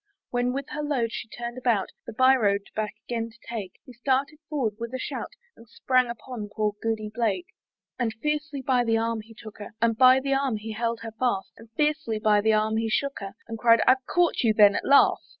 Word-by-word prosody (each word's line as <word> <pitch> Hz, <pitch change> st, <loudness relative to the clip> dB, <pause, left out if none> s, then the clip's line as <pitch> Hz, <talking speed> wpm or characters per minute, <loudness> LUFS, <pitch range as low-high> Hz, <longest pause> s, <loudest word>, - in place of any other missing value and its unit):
When 245 Hz, 0 st, +1 dB
with 275 Hz, +1 st, -4 dB
her 300 Hz, -, -4 dB
load 265 Hz, -6 st, -1 dB
she -, -, -5 dB
turned 240 Hz, +2 st, -6 dB
about, 235 Hz, -6 st, +1 dB, 0.2 s
The -, -, -6 dB
bye 260 Hz, +3 st, +5 dB
road 200 Hz, -5 st, +2 dB
back 215 Hz, 0 st, -2 dB
again 230 Hz, -1 st, -2 dB
to 230 Hz, -, -20 dB
take, 215 Hz, -6 st, -5 dB
He 255 Hz, -, -12 dB
started 270 Hz, +5 st, -1 dB
forward 245 Hz, -9 st, -1 dB
with 235 Hz, +2 st, -5 dB
a -, -, -3 dB
shout, -, -, -4 dB, 0.3 s
And 230 Hz, -, -17 dB
sprang 255 Hz, +1 st, +2 dB
upon 235 Hz, -2 st, -7 dB
poor 215 Hz, -1 st, -1 dB
Goody 220 Hz, -2 st, -2 dB
Blake. 235 Hz, -, 0 dB, 0.5 s
And 235 Hz, -3 st, 0 dB
fiercely 300 Hz, +2 st, -3 dB
by 250 Hz, -2 st, +2 dB
the 225 Hz, -1 st, +2 dB
arm 230 Hz, 0 st, -1 dB
he 225 Hz, +1 st, -16 dB
took 215 Hz, -1 st, -12 dB
her, 205 Hz, 0 st, -9 dB
And 230 Hz, 0 st, +2 dB
by 255 Hz, +3 st, +7 dB
the 275 Hz, +1 st, -1 dB
arm 270 Hz, -4 st, 0 dB
he 220 Hz, +1 st, -7 dB
held 230 Hz, +1 st, -2 dB
her 225 Hz, -1 st, -6 dB
fast, 225 Hz, -4 st, -1 dB
And 225 Hz, 0 st, -15 dB
fiercely 300 Hz, -7 st, 0 dB
by 215 Hz, -1 st, +3 dB
the 220 Hz, +1 st, +3 dB
arm 215 Hz, +1 st, +1 dB
he 225 Hz, 0 st, 0 dB
shook 280 Hz, +5 st, -1 dB
her, 195 Hz, 0 st, -7 dB
And 225 Hz, -1 st, -6 dB
cried, 230 Hz, -1 st, +5 dB
"I've 260 Hz, 0 st, +4 dB
caught 350 Hz, -1 st, +2 dB
you 220 Hz, -3 st, +2 dB
then 205 Hz, -2 st, +7 dB
at -, -, -2 dB
last!" 280 Hz, -, +4 dB
230 Hz, 225 wpm, -26 LUFS, 220-260 Hz, 0.5 s, by